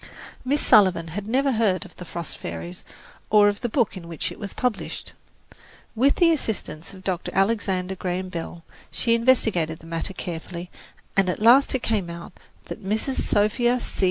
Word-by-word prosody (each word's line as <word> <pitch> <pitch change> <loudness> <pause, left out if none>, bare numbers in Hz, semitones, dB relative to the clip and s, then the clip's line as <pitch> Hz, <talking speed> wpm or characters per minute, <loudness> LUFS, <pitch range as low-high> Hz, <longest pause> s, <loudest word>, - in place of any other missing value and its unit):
Miss 285 +3 +1
Sullivan 185 -5 +4
had 200 +5 -5
never 270 +4 +2
heard 210 -7 +1
of - - -15
"The 180 - -9
Frost 170 -2 -5
Fairies" 85 +1 -7 0.5
or 210 -1 +6
of 205 - -4
the 240 - -1
book 235 -2 +1
in 175 -3 -8
which 165 -2 -3
it - - -10
was 200 -2 -5
published. 245 -5 -3 0.8
With 265 +5 +3
the 340 -2 +5
assistance 215 - -3
of 190 - -13
Dr. 185 -2 -2
Alexander 195 -2 +1
Graham 185 0 -3
Bell, 170 -1 -6 0.3
she 230 - +1
investigated 220 -9 +2
the 165 - -16
matter 165 +3 -4
carefully, 175 0 -6 0.4
and 195 -1 +3
at 180 - -2
last 245 +6 +6
it 255 - -2
came 205 -6 0
out 170 +1 -8 0.3
that 220 - -8
Mrs. 220 +7 -1
Sophia 240 +4 +2
C. - - -6
195 Hz, 175 wpm, -24 LUFS, 175-230 Hz, 0.8 s, or